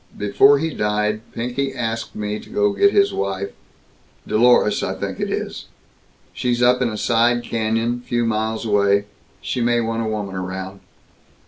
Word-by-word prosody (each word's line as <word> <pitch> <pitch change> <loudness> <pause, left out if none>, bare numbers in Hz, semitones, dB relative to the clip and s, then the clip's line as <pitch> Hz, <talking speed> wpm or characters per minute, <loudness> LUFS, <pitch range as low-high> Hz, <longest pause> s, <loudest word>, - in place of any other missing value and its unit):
Before 135 +8 +5
he 160 +3 -2
died, 105 0 0
Pinky 130 +3 -3
asked 115 -2 -3
me 105 0 -3
to - - -14
go 105 0 +1
get 200 - +4
his 200 -1 +3
wife 100 0 -3 0.7
Dolores, 110 -1 +3
I - - -2
think - - -5
it - - -2
is. - - -4 0.7
She's 120 -1 0
up 125 +1 +4
in 125 - +2
a 110 - -5
side 120 +2 +2
canyon, 115 +1 -1
few 120 -1 -1
miles 110 0 -1
away. 100 -1 +2 0.4
She 125 - -3
may 120 0 +2
want 115 0 -1
a 110 - -2
woman 105 -3 -4
around. 95 +1 -5
110 Hz, 160 wpm, -21 LUFS, 105-120 Hz, 0.7 s, Before